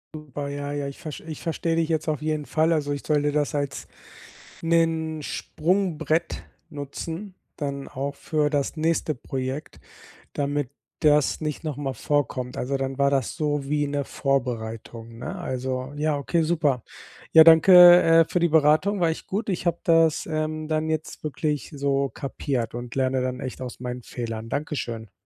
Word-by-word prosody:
Super. 145 Hz, -2 st, -6 dB
Ja, 145 Hz, 0 st, -4 dB
ja, 145 Hz, -1 st, -2 dB
ich 140 Hz, -, -12 dB
verst 155 Hz, -2 st, -7 dB
ich 160 Hz, -2 st, -8 dB
verstehe 165 Hz, 0 st, -1 dB
dich 165 Hz, -1 st, +2 dB
jetzt 160 Hz, -1 st, -1 dB
auf 150 Hz, -3 st, -1 dB
jeden 155 Hz, -1 st, -2 dB
Fall. 160 Hz, +1 st, +2 dB
Also, 145 Hz, -2 st, -1 dB
ich 140 Hz, -1 st, -4 dB
sollte 145 Hz, -1 st, +2 dB
das 145 Hz, -1 st, 0 dB
als 145 Hz, -1 st, -3 dB, 0.7 s
'nen 165 Hz, -2 st, +1 dB
Sprungbrett 165 Hz, -2 st, -1 dB, 0.3 s
nutzen, 165 Hz, +6 st, -6 dB, 0.2 s
dann 140 Hz, -2 st, -4 dB
auch 140 Hz, +2 st, -4 dB
für 150 Hz, 0 st, 0 dB
das 145 Hz, +2 st, -1 dB
nächste 160 Hz, -1 st, 0 dB
Projekt, 130 Hz, -, -5 dB, 0.5 s
damit 145 Hz, -2 st, -1 dB, 0.3 s
das 150 Hz, -1 st, +3 dB
nicht 150 Hz, 0 st, -3 dB
noch 150 Hz, -4 st, -4 dB
mal 135 Hz, -2 st, -3 dB
vorkommt. 130 Hz, -4 st, -1 dB
Also, 135 Hz, +2 st, -1 dB
dann 135 Hz, 0 st, -3 dB
war 140 Hz, 0 st, +4 dB
das 135 Hz, -4 st, 0 dB
so 145 Hz, -2 st, -1 dB
wie 145 Hz, 0 st, 0 dB
'ne 145 Hz, 0 st, -1 dB
Vorbereitung, 115 Hz, -3 st, -3 dB
ne? 155 Hz, +10 st, -5 dB
Also, 130 Hz, -5 st, -3 dB
ja 150 Hz, 0 st, +1 dB
okay, 160 Hz, +4 st, 0 dB
super. 150 Hz, -7 st, +1 dB, 0.5 s
Ja, 160 Hz, -, +10 dB
danke, 175 Hz, +2 st, +9 dB
äh, 165 Hz, 0 st, +6 dB
für 180 Hz, -, -1 dB
die 170 Hz, -, +3 dB
Beratung, 160 Hz, +6 st, +3 dB
war 170 Hz, -2 st, +3 dB
echt 160 Hz, -, -4 dB
gut. 205 Hz, +2 st, -3 dB
Ich 185 Hz, -, -2 dB
habe 170 Hz, -1 st, +1 dB
das, 165 Hz, -2 st, +3 dB
ähm, 155 Hz, 0 st, -2 dB
dann 155 Hz, 0 st, 0 dB
jetzt 155 Hz, 0 st, -4 dB
wirklich 150 Hz, -1 st, -2 dB
so 140 Hz, -1 st, 0 dB
kapiert 130 Hz, -5 st, -3 dB
und 120 Hz, -1 st, -6 dB
lerne 130 Hz, -1 st, +1 dB
dann 125 Hz, 0 st, -3 dB
echt 130 Hz, 0 st, -6 dB
aus 125 Hz, -2 st, -7 dB
meinen 125 Hz, 0 st, -5 dB
Fehlern. 115 Hz, -2 st, -5 dB
Dankeschön. 120 Hz, -, -4 dB
145 Hz, 170 wpm, -25 LUFS, 135-160 Hz, 0.7 s, Ja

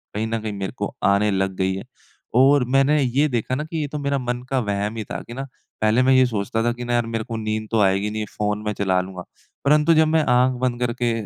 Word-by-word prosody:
कहीं 110 Hz, +1 st, -1 dB
न 115 Hz, 0 st, -2 dB
कहीं 110 Hz, -1 st, -4 dB
मेरे 100 Hz, -1 st, -4 dB
को -, -, -3 dB
आने 100 Hz, +2 st, +3 dB
लग 95 Hz, 0 st, -1 dB
गई 95 Hz, 0 st, +1 dB
है। 95 Hz, -, -6 dB, 0.6 s
और 135 Hz, +1 st, +5 dB
मैंने 145 Hz, +2 st, +4 dB
ये 135 Hz, +3 st, +2 dB
देखा 125 Hz, 0 st, -1 dB
ना 150 Hz, -, -2 dB
कि 165 Hz, +1 st, -6 dB
ये 145 Hz, -, -2 dB
तो 150 Hz, -, -5 dB
मेरा 140 Hz, 0 st, 0 dB
मन 125 Hz, -1 st, -3 dB
का 135 Hz, -1 st, +1 dB
वहम 105 Hz, 0 st, -2 dB
ही 110 Hz, -, -3 dB
था -, -, -5 dB
कि 120 Hz, -, -8 dB
ना 135 Hz, +2 st, -4 dB, 0.4 s
पहले 110 Hz, +3 st, +3 dB
मैं 130 Hz, -, +4 dB
ये 130 Hz, 0 st, +6 dB
सोचता 115 Hz, -1 st, -2 dB
था 120 Hz, -, +2 dB
कि 120 Hz, 0 st, -7 dB
ना 120 Hz, -, -2 dB
यार 120 Hz, -1 st, +2 dB
मेरे 115 Hz, -1 st, -3 dB
को 115 Hz, +1 st, -5 dB
नींद 110 Hz, 0 st, -3 dB
तो 115 Hz, -, +2 dB
आएगी 100 Hz, +2 st, +2 dB
नहीं 110 Hz, 0 st, -3 dB
फ़ोन 105 Hz, 0 st, -1 dB
मैं 105 Hz, -, -1 dB
चला 95 Hz, -2 st, +1 dB
लूँगा। 90 Hz, -1 st, -8 dB, 0.4 s
परंतु 150 Hz, +3 st, +4 dB
जब 160 Hz, 0 st, +4 dB
मैं 160 Hz, 0 st, +2 dB
आँख 125 Hz, +1 st, +4 dB
बंद 125 Hz, -1 st, 0 dB
करके 120 Hz, 0 st, 0 dB
115 Hz, 260 wpm, -22 LUFS, 105-130 Hz, 0.6 s, ये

